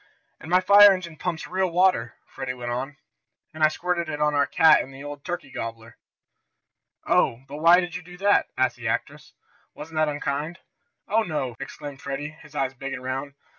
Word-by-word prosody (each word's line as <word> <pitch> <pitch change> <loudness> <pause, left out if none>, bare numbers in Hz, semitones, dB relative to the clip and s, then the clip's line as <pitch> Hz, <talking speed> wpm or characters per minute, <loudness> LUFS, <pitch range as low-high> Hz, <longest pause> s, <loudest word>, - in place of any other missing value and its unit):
"And 160 - -10
my 180 +1 +4
fire 205 +2 +8
engine 175 -4 -6
pumps 165 0 -4
real 185 0 0
water," 175 -9 +2
Freddie 135 -1 -6
went 120 -1 -5
on, 135 +3 -4 0.6
"and 155 0 -3
I - - +8
squirted 170 +1 -2
it 150 -1 -4
on 150 0 +2
our 145 -1 +2
cat 160 -1 +6
and - - -2
on 135 - -14
the 135 +1 -10
old 145 -1 -8
turkey 175 -6 -5
gobbler." 115 -1 -7 1.1
"Oh, 120 +3 +2
but 145 +1 -8
why 170 +3 +6
did 175 -1 -5
you 180 - -4
do 180 +1 -13
that?" 200 +2 +3
asked 125 -2 +1
the 115 -1 -5
actress. 110 - -3 0.4
"Wasn't 160 +1 -9
that 155 -1 +3
unkind?" 145 +3 -3 0.5
"Oh, 220 +2 +2
no!" 150 - -3
exclaimed 135 0 -8
Freddie, 140 +2 -4
his 150 0 -16
eyes 135 -2 -1
big 135 +1 -6
and 125 - -6
round. 135 +2 -4
150 Hz, 200 wpm, -25 LUFS, 135-175 Hz, 1.1 s, fire